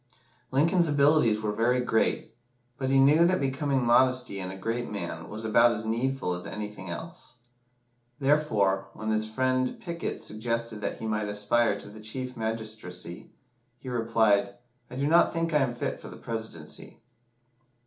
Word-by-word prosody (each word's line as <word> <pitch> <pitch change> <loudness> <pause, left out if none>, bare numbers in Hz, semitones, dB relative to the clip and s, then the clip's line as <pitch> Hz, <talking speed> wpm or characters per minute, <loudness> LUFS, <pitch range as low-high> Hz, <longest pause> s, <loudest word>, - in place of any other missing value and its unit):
Lincoln's 165 +6 +3
abilities 145 -7 +4
were 105 - 0
very 120 +4 +2
great, 115 -3 0 0.5
"but 130 -1 -1
he 135 - +4
knew 145 +5 +6
that 185 +2 +3
becoming 135 -1 0
modesty 125 -3 +3
in 90 -1 -4
a 95 - -7
great 115 +5 -3
man 85 -5 -5
was 110 +1 -6
about 115 +2 +5
as 110 0 -5
needful 120 -2 -1
as 90 0 -6
anything 105 -3 -6
else." 165 - -8 0.9
Therefore, 110 -10 +2
when 110 0 -3
his 110 0 0
friend 130 +2 0
Pickett 170 0 -4
suggested 115 0 -3
that - - -3
he - - -6
might 105 -1 -1
aspire 105 +1 +1
to - - -9
the 105 +1 -11
Chief 125 +4 -6
Magistracy, 110 -6 -5 0.5
he 130 +1 -9
replied, 115 -2 +2 0.3
"I 125 - -9
do 140 +2 -1
not 165 +3 +5
think 165 -1 -1
I 150 - +5
am 125 -3 0
fit - - -3
for - - -10
the - - -10
Presidency." 110 -9 -7
115 Hz, 160 wpm, -28 LUFS, 105-135 Hz, 0.9 s, knew